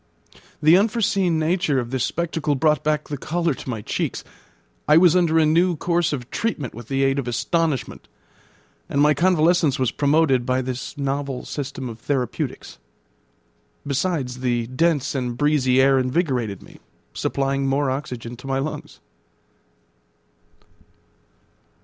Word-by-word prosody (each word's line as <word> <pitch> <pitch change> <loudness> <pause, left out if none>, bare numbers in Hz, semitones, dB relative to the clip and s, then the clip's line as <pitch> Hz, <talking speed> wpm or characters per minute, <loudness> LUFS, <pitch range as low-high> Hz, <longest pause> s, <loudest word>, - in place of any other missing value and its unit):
The 160 +4 +7
unforeseen 200 -5 +1
nature 160 -2 +1
of 120 -1 -2
this 130 -2 -1
spectacle 160 -3 -1
brought 150 +1 +2
back 150 0 0
the 145 -3 -5
colour 170 +1 -1
to 130 - -9
my 110 -4 -4
cheeks. - - -3 0.6
I 150 - +6
was 175 0 +6
under 170 -3 +3
a 160 - +5
new 170 +3 +3
course 170 +1 0
of 130 -5 -5
treatment 155 - -2
with 115 0 -10
the 135 +2 0
aid 135 +1 +2
of 130 - -4
astonishment, 155 +3 -1 0.8
and 140 - -1
my 150 +1 +5
convalescence 170 -2 +3
was 130 -3 0
promoted 145 -3 +2
by 130 +1 0
this 130 +4 -5
novel 140 -1 -3
system 135 -2 -5
of 115 -1 -8
therapeutics; 125 - -3 1.1
besides, 140 -3 -2
the 120 -2 0
dense 145 +3 0
and 125 -3 -3
breezy 140 -3 +2
air 135 0 +5
invigorated 130 - -1
me, - - -16 0.3
supplying 135 0 -1
more 135 0 +1
oxygen 125 -4 -5
to 125 - -11
my 135 0 0
lungs. 140 +3 -5
140 Hz, 140 wpm, -22 LUFS, 130-160 Hz, 1.1 s, The